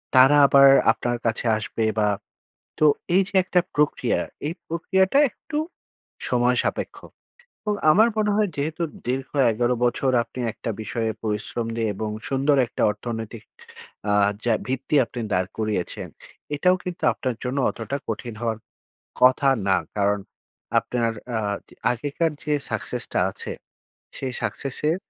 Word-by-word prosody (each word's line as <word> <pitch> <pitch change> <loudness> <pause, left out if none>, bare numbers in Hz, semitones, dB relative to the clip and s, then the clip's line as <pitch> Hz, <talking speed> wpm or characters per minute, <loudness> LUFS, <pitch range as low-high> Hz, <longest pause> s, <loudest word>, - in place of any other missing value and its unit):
তারা 135 +3 +7
আবার 140 0 +7 0.2
আপনার 120 +1 -2
কাছে 115 +1 -1
আসবে 110 +1 -3 0.2
বা, 105 -1 +3 0.7
তো 155 - +5 0.3
এই 190 - +6
যে - - -13
১টা 180 0 +3 0.2
প্রক্রিয়া 150 0 +1 0.3
এই 155 - -1 0.2
প্রক্রিয়াটাই 190 - +3
একটু 300 - -5 0.7
সময় 125 0 +2
সাপেক্ষ, - - -2 0.7
এবং 210 -1 0 0.2
আমার 215 +8 +6
মনে 210 -1 +2
হয় 210 -1 +2
যেহেতু 155 +4 -2 0.2
দীর্ঘ 130 +1 -2 0.2
১১ 120 +3 +1
বছর 125 +2 +1
আপনি 130 - -11
১টা - - -6
বিষয়ে 115 0 -2
পরিশ্রম 110 +2 -2
দিয়ে 115 -1 0
এবং 110 +2 -3 0.2
সুন্দর 140 +1 +2
১টা - - -5
অর্থনৈতিক 110 +1 -6 0.7
আ - - +3 0.3
যা 120 - +3
ভিত্তি 130 +3 -1
আপনি 120 +1 -6
দাঁড় 90 0 +1
করিয়েছেন, 105 -5 -2 0.5
এটাও 180 +5 +3
কিন্তু 180 -1 -6
আপনার 130 -5 -3
জন্য 125 +2 -2
অতটা 120 +4 -4
কঠিন 115 +2 -4
হওয়ার, 115 -2 -1 0.6
কথা 130 +2 +5 0.2
না 95 - +4 0.2
কারণ 100 0 +2 0.6
আপনার 115 -2 -1 0.3
আ - - 0 0.3
যে - - -18 0.2
আগেকার 145 +6 -1
যে 150 - 0 0.2
success - - -2
টা - - +2
আছে, - - -5 0.7
সেই 130 -1 -4
success 135 -2 -2
এর, 165 - +1
125 Hz, 145 wpm, -24 LUFS, 115-150 Hz, 0.7 s, তারা